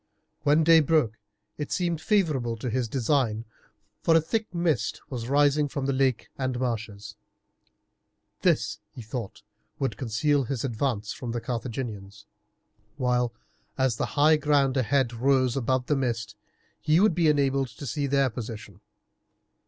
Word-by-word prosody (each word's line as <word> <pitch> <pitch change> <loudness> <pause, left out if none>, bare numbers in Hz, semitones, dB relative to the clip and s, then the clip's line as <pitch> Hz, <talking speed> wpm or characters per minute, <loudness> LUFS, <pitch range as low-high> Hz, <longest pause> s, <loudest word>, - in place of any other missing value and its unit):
When 150 +2 +4
day 165 0 +7
broke 150 -8 +1 0.4
it 150 - -4
seemed 170 -4 -1
favourable 150 - +1
to 120 +2 -4
his 125 0 0
design, 115 -3 0 0.6
for 165 - +4
a - - +7
thick 220 +7 -2
mist 165 - 0
was 120 -2 -4
rising 145 +1 +3
from 140 -1 -4
the 135 - +1
lake 130 -3 0
and 130 -2 -1
marshes. 110 -4 -4 1.3
This, 105 -1 +1
he 115 +3 -10
thought, 110 -1 -6 0.3
would 135 - -2
conceal 135 +3 +1
his 130 -2 -3
advance 115 -4 -2
from 120 -3 -5
the 120 - -1
Carthaginians, 115 -4 -5 0.7
while, 125 -2 +1 0.5
as 130 -4 +1
the - - -1
high 155 +2 +6
ground 145 -3 +2
ahead 130 -1 +1
rose 130 +1 +2
above 130 -1 0
the 150 - +1
mist, 115 -4 -2 0.4
he 155 +2 +3
would 210 -1 +4
be 165 -1 +2
enabled 140 -2 +2
to 115 +4 -10
see 140 +3 -2
their 135 -2 +2
position. 105 -4 -8
130 Hz, 145 wpm, -26 LUFS, 115-145 Hz, 1.3 s, day